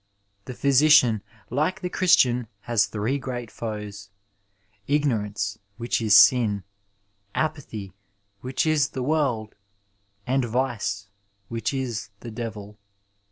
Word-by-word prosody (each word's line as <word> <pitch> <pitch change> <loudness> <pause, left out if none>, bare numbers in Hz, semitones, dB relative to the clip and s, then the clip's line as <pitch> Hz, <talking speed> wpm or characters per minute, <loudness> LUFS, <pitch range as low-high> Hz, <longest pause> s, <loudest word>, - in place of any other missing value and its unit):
The 130 - -6
physidan, 135 -5 +5 0.3
like 155 +10 0
the 180 - -2
Chris 185 -2 +5
tian, 125 -2 +2
has 115 -2 +2
three 115 +7 -2
great 120 -4 -5
foes 105 -3 -6 0.4
— 100 0 -31
^ignorance, 110 -8 0 0.2
which 120 0 -1
is 110 -3 +6
sin; 110 -6 +5 0.7
apathy, 115 - -3 0.5
which 130 +6 -1
is 155 -2 +2
the 130 - -1
world; 130 -7 0 0.7
and 130 +1 +1
vice, 115 -5 -2 0.4
which 115 -1 -2
is 125 -6 -3
the 120 - -7
devil. 110 -2 -7
120 Hz, 115 wpm, -25 LUFS, 105-135 Hz, 0.7 s, is